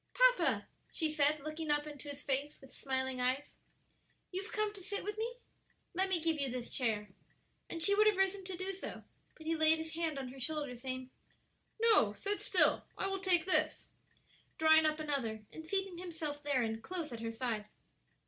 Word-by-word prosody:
"Papa" - - +4 0.2
she 315 -2 +1
said, 300 0 +4
looking 310 +1 -5
up 295 0 +3
into 295 -1 -8
his 285 0 -7
face 280 +2 -1
with 270 -1 -15
smiling 260 -1 -1
eyes, 255 +3 +1 0.8
"you 370 +1 -2
have 390 - -9
come 425 0 0
to 400 - -9
sit 405 +2 -3
with 420 +1 -3
me? 470 +2 -2 0.6
Let 380 +2 +1
me 365 -3 +2
give 320 -1 0
you 275 -1 +1
this 245 -1 -4
chair," 215 -5 0 0.6
and 330 - -4
she 400 - +4
would 425 +1 +5
have 420 -3 +4
risen 385 0 +1
to 370 -1 -4
do 375 +2 -3
so, 385 - -7 0.3
but 315 - -13
he 325 +1 +1
laid 315 0 +5
his 320 0 -5
hand 325 -3 -1
on 265 -2 -4
her 265 +1 -10
shoulder, 290 -1 -3
saying, 255 +1 -5 0.7
"No; 440 - +5
sit 405 - -2
still; - - +4
I - - -1
will 390 0 -1
take 365 -3 +3
this," 375 - +2 0.7
drawing 315 0 +6
up 310 0 0
another 245 -8 -2
and 320 - -8
seating 385 +1 -2
himself 320 -5 -5
therein 245 -6 0
close 335 0 -4
at 230 - -6
her 230 0 -3
side. 225 -2 -2
310 Hz, 195 wpm, -34 LUFS, 265-370 Hz, 0.8 s, drawing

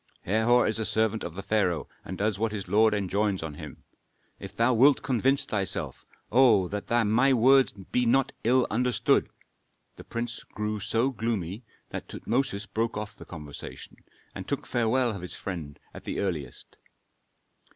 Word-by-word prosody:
Herhor 110 +5 +3
is 110 +1 0
a - - 0
servant 110 0 0
of 85 - -6
the 100 - -6
pharaoh 95 -5 0 0.2
and 95 - -7
does 105 0 0
what 115 0 0
his 100 -3 -5
lord 110 +1 +4
enjoins 100 -1 0
on 80 -2 -5
him. 75 -1 -10 0.6
If - - -9
thou 115 +2 +3
wilt 135 +5 +5
convince 135 +1 +2
thyself 100 -3 -3 0.2
oh, 115 -7 +5
that 105 0 -5 0.2
my 125 +6 +4
words 130 +2 +5
be 110 +5 -2
not 135 +2 +3
ill 125 +2 +4
understood 125 0 +2 0.3
" - - -46
The - - -10
prince 115 0 -4
grew 105 0 -4
so 115 +6 0
gloomy 110 -4 -3 0.3
that - - -6
Tutmosis 125 -4 -1
broke 115 0 -2
off 105 0 -5
the - - -12
conversation 75 -4 -9 0.4
and - - -7
took - - -3
farewell 120 +1 +1
of 100 -4 -6
his 90 - -5
friend 80 -7 -6 0.2
at - - -10
the - - -3
earliest. 85 -8 -4
110 Hz, 165 wpm, -27 LUFS, 100-120 Hz, 0.6 s, wilt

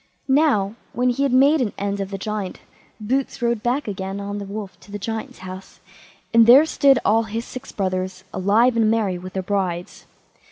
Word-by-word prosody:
Now, 265 -8 +3 0.2
when 250 +1 +1
he 245 - -3
had 280 -2 +2
made 275 +4 +5
an 225 -5 -1
end 200 0 -2
of 195 -1 -3
the 195 - -5
Giant, 205 -1 -4 0.4
Boots 255 +6 -2
rode 235 -2 0
back 250 +4 -1
again 195 -1 -4
on 200 +1 -4
the 200 - -6
wolf 200 0 -7
to 205 - -17
the 205 - -4
Giant's 220 +2 -5
house, 185 +1 -10 0.5
and 230 -1 +6
there 265 +6 +8
stood 275 -4 +4
all 225 +2 +3
his 225 +2 -4
six 255 +2 -9
brothers 185 -1 -3
alive 220 +6 +3
and 225 -2 +3
merry, 210 -5 0
with 185 +1 -9
their 190 - -3
brides. 180 -3 -3
210 Hz, 195 wpm, -22 LUFS, 195-245 Hz, 0.5 s, there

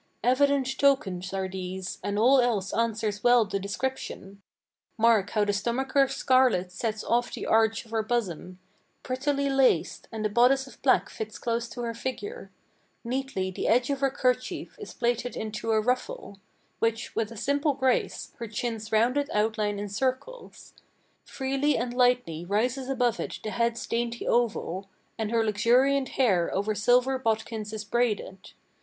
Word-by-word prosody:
Evident 265 +1 +2
tokens 190 -10 +2
are 190 -1 -2
these, 185 0 -5
and 205 0 -2
all 255 +5 +5
else 215 -6 0
answers 220 -2 -1
well 245 -2 +5
the 200 -1 -3
description. 200 -2 -5 0.6
Mark 220 -3 +4
how 210 -1 +1
the 205 - 0
stomacher's 265 +5 +1
scarlet 255 -11 +3
sets 215 +3 -3
off 240 +1 +1
the - - -5
arch 225 0 +2
of 225 - -18
her 225 -1 +1
bosom, 190 -6 -3 0.5
Prettily 280 +2 -1
laced, 270 -1 +2
and 220 -2 -4
the - - +2
bodice 250 +5 +4
of 260 -5 -15
black 265 - +3
fits 215 0 -7
close 235 0 -2
to 245 - -7
her 230 -1 -2
figure; 410 - -5 0.5
Neatly 245 -6 -2
the - - -3
edge 245 +3 +3
of 275 - -1
her 275 0 +2
kerchief 255 -1 -1
is 420 - -8
plaited 240 0 -1
into 220 +1 -4
a 220 -1 +3
ruffle, 250 - -2 0.4
Which, 225 0 -1
with 225 -1 -1
a 230 - -9
simple 285 +4 +1
grace, 260 -2 0
her 230 - -4
chin's 220 0 -4
rounded 250 +6 +2
outline 210 -1 0
encircles; 260 - -4 0.5
Freely 275 +2 0
and 240 +1 -2
lightly 245 -10 +2
rises 245 +8 -1
above 245 -3 +1
it - - -4
the 215 - -4
bead's 235 0 0
dainty 235 0 -2
oval, 200 -5 0 0.3
And 220 -1 -1
her 230 0 +1
luxuriant 255 +6 +3
hair 195 -10 +3
over 205 +3 0
silver 250 +5 +3
bodkins 220 -2 -2
is 215 -1 -5
braided. 215 -4 -2
235 Hz, 155 wpm, -27 LUFS, 210-260 Hz, 0.6 s, all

